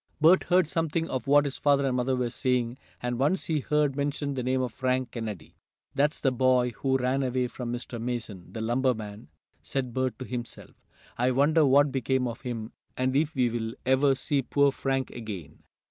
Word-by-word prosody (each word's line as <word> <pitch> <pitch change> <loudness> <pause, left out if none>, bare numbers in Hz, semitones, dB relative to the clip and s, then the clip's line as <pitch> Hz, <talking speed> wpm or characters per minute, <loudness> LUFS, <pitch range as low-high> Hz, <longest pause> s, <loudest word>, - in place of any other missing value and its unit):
Bert 165 +4 +5
heard 180 -2 +3
something 165 0 -1
of 130 -2 -3
what 145 +1 +5
his 140 - -3
father 140 -1 +3
and 130 -2 0
mother 125 +1 +1
were 125 -2 -1
saying, 125 -1 0 0.2
and 120 0 -2
once 150 +8 +1
he 155 -2 0
heard 150 -1 +1
mentioned 140 0 -2
the 130 - -2
name 130 +1 0
of 125 -3 -4
Frank 130 -2 -1
Kennedy. 105 -9 -6 0.4
"That's 145 +2 +1
the 135 - +2
boy 125 -1 +3
who 135 -1 +1
ran 130 +1 0
away 130 -1 0
from 120 -1 -6
Mr. 120 -1 -5
Mason, 115 -7 -5
the 110 - -5
lumber 125 +3 +1
man," 105 0 -8 0.3
said 130 -3 -3
Bert 130 0 -1
to 130 - -6
himself. 120 -1 -6 0.5
"I 125 +1 +3
wonder 145 +4 +4
what 140 +1 +5
became 130 -1 0
of 120 +2 -6
him, 120 -4 -5 0.3
and 130 +1 0
if 155 +2 +1
we'll 120 -3 0
ever 135 +1 +4
see 140 +1 0
poor 140 +2 +3
Frank 135 -1 -2
again?" 105 -10 -8
130 Hz, 190 wpm, -27 LUFS, 120-140 Hz, 0.5 s, Bert